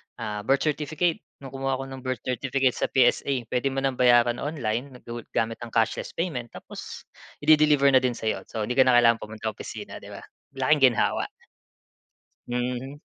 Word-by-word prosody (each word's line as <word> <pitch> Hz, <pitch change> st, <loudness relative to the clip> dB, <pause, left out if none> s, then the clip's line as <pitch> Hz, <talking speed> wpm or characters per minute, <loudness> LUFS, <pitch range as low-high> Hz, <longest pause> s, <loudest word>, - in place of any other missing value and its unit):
ah, 105 Hz, -3 st, -4 dB
birth 135 Hz, 0 st, +3 dB
certificate, 155 Hz, +3 st, 0 dB, 0.2 s
nung 135 Hz, -, -8 dB
kumuha 135 Hz, 0 st, -1 dB
ako 135 Hz, -, -5 dB
ng 135 Hz, -, -7 dB
birth 130 Hz, -2 st, -4 dB
certificate 130 Hz, +1 st, 0 dB
sa -, -, -2 dB
PSA. 130 Hz, -1 st, +2 dB
Puwede 125 Hz, +2 st, +1 dB
mo 135 Hz, 0 st, -2 dB
ng 135 Hz, -2 st, -1 dB
bayaran 120 Hz, -1 st, +4 dB
online 130 Hz, -3 st, -3 dB
go 120 Hz, 0 st, -6 dB, 0.2 s
gamit 115 Hz, 0 st, 0 dB
ang 120 Hz, -1 st, -8 dB
cashless 115 Hz, -1 st, 0 dB
payment 145 Hz, -9 st, -3 dB
tapos -, -, -9 dB, 0.4 s
i-de-deliver 150 Hz, -2 st, +5 dB
na 130 Hz, -, +6 dB
din 125 Hz, -2 st, -1 dB
sa'yo. 110 Hz, -2 st, -3 dB
So, 110 Hz, -2 st, -4 dB
'di 125 Hz, +3 st, -2 dB
ka -, -, +9 dB
na 125 Hz, -, +5 dB
kailangan 115 Hz, -1 st, +5 dB
pumunta 110 Hz, +1 st, -5 dB
ng -, -, -23 dB
opisina -, -, -8 dB
'di -, -, -13 dB
ba, -, -, -9 dB, 0.3 s
laking 135 Hz, -1 st, +4 dB
ginhawa. -, -, 0 dB, 1.2 s
Mhm. 125 Hz, +3 st, -3 dB
130 Hz, 180 wpm, -26 LUFS, 120-135 Hz, 1.2 s, ka